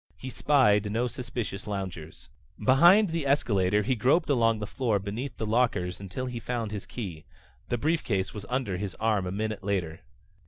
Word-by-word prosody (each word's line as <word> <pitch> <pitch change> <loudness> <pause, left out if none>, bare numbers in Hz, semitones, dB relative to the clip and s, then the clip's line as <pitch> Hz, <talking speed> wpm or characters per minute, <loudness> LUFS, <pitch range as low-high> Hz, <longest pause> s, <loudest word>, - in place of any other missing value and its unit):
He 130 - -7
spied 105 -6 +3
no 120 +3 0
suspicious 120 -4 -5
loungers. 95 -6 -6 0.3
Behind 175 +10 +6
the 165 -4 -2
escalator 105 -7 +2
he 130 - +1
groped 135 +7 +2
along 115 -4 +3
the 105 - -4
floor 115 -1 0
beneath 110 +6 -5
the 110 - -2
lockers 105 -6 0
until 100 +6 -5
he 125 -2 -4
found 115 -2 -3
his 105 -2 -6
key. 90 -10 -6 0.5
The 120 - 0
briefcase 120 - 0
was 100 -2 -8
under 125 -7 -1
his 100 0 -4
arm 105 -4 0
a - - -3
minute 110 +2 -3
later. 90 -4 -2
110 Hz, 170 wpm, -28 LUFS, 100-125 Hz, 0.5 s, Behind